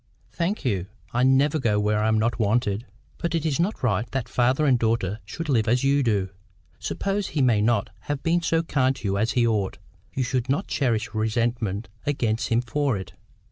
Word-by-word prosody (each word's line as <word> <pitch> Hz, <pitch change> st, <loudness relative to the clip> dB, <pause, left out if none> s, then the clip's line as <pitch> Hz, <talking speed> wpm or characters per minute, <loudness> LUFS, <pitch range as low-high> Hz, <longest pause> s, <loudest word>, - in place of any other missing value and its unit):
"Thank 180 Hz, +2 st, -2 dB
you. 95 Hz, -7 st, 0 dB, 0.3 s
I 120 Hz, -, +1 dB
never 135 Hz, +4 st, +4 dB
go 110 Hz, -5 st, +1 dB
where 105 Hz, 0 st, +1 dB
I 105 Hz, -, +1 dB
am 110 Hz, 0 st, +3 dB
not 115 Hz, +3 st, 0 dB
wanted." 110 Hz, 0 st, +1 dB, 0.3 s
"But 170 Hz, -1 st, -1 dB
it 165 Hz, -1 st, -1 dB
is 155 Hz, -1 st, 0 dB
not 180 Hz, 0 st, -1 dB
right 110 Hz, -1 st, +1 dB
that 130 Hz, -3 st, -1 dB
father 125 Hz, +4 st, +2 dB
and 130 Hz, -4 st, +4 dB
daughter 110 Hz, -3 st, 0 dB
should 165 Hz, +10 st, -6 dB
live 115 Hz, -6 st, +2 dB
as 125 Hz, +3 st, +2 dB
you 140 Hz, +1 st, +3 dB
do. 105 Hz, -7 st, +1 dB, 0.5 s
Suppose 200 Hz, 0 st, -2 dB
he 150 Hz, -, -1 dB
may 115 Hz, -5 st, +3 dB
not 110 Hz, -2 st, +1 dB
have 145 Hz, -2 st, -4 dB
been 170 Hz, +1 st, +2 dB
so 165 Hz, -1 st, +1 dB
kind 135 Hz, -4 st, +1 dB
to 110 Hz, -, -5 dB
you 100 Hz, 0 st, 0 dB
as 115 Hz, +3 st, +1 dB
he 120 Hz, -2 st, +3 dB
ought, 105 Hz, -4 st, 0 dB, 0.3 s
you 130 Hz, -, -1 dB
should 125 Hz, 0 st, -1 dB
not 145 Hz, +9 st, +1 dB
cherish 115 Hz, -6 st, -1 dB
resentment 110 Hz, -1 st, -1 dB, 0.2 s
against 115 Hz, -6 st, 0 dB
him 115 Hz, +1 st, +2 dB
for 135 Hz, -1 st, 0 dB
it. 95 Hz, -2 st, -8 dB
120 Hz, 205 wpm, -25 LUFS, 110-140 Hz, 0.5 s, never